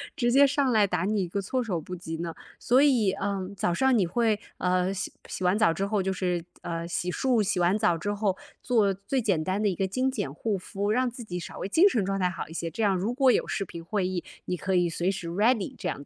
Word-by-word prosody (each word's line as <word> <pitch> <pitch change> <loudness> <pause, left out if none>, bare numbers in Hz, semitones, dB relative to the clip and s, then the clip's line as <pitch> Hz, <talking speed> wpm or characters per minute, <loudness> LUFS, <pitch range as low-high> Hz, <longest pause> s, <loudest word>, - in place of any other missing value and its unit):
直 240 -5 +1
接 280 +2 +6
上 275 -1 +1
来 215 -3 +4
打 180 -2 -1
你 205 +1 +1
一 - - -3
个 200 +4 -2
措 255 +7 -1
手 185 -9 -2
不 180 - -9
及 170 -2 -5
呢。 170 -1 -3 0.2
所 255 +3 +3
以， 245 -9 +4
嗯， 195 -1 -2
早 180 -3 0
上 265 +6 +3
你 185 - +2
会， 220 +3 +1 0.2
呃， 180 +1 +1
洗 190 - -4 0.2
洗 185 - -5
完 180 +4 +2
澡 215 -7 +4
之 195 +4 -1
后 200 0 0
就 190 0 -1
是 180 -2 -1 0.2
嗯， 170 0 -4
洗 175 +1 -2
漱， 240 0 +2
洗 195 -2 0
完 175 +3 +3
澡 210 -6 +2
之 205 +5 -2
后， 205 -2 0 0.2
做 215 -6 +2
最 200 +8 -2
简 195 -8 +1
单 190 +4 -1
的 215 - +2
一 190 - 0
个 190 - 0
精 255 +7 0
简 140 - -3
护 205 +6 -2
肤， 200 +2 -3
让 250 +3 +1
自 245 - -9
己 180 -6 -5
稍 175 - -7
微 - - -3
精 335 - +5
神 220 - 0
状 195 +1 -1
态 180 -2 +1
好 180 - -6
一 160 - -11
些， 165 0 -3
这 225 - -4
样 200 -3 +3
如 200 +6 -1
果 265 +1 +4
有 - - +3
视 195 - -2
频 170 -1 -9
会 190 +1 -1
议， 185 -2 -3 0.2
你 180 - -2
可 190 +2 -2
以 175 -1 +3
随 175 +3 0
时 185 -3 -5
ready 205 +5 +1
这 - - -3
样 - - -4
195 Hz, 305 characters per minute, -27 LUFS, 180-225 Hz, 0.2 s, 接